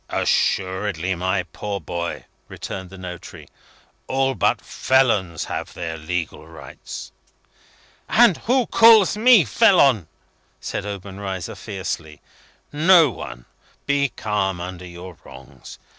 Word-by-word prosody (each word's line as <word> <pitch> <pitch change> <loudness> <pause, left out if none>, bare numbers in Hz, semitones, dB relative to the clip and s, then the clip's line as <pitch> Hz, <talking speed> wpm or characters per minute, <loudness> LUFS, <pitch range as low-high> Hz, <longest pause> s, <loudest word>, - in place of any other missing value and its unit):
"Assuredly, 95 -1 0
my 95 +2 -1
poor 100 +2 -6
boy," 85 -2 -5 0.2
returned 95 -1 -7
the 95 - -12
notary. 90 -2 -9 0.6
"All 135 0 +1
but - - +1
felons 110 - +1
have - - -6
their 85 -2 -5
legal 80 0 -5
rights." 70 -6 -10 1.0
"And 230 -7 +5
who 255 -1 +3
calls 225 -4 +6
me 220 - +6
felon?" 125 - +4 0.5
said 105 - -5
Obenreizer, 95 -2 -6
fiercely. 85 -7 -6 0.5
"No 160 -1 +5
one. - - -9 0.4
Be 140 0 +1
calm 100 -5 -2
under 90 0 -7
your 90 0 -10
wrongs. 65 0 -13
95 Hz, 110 wpm, -22 LUFS, 85-135 Hz, 1.0 s, calls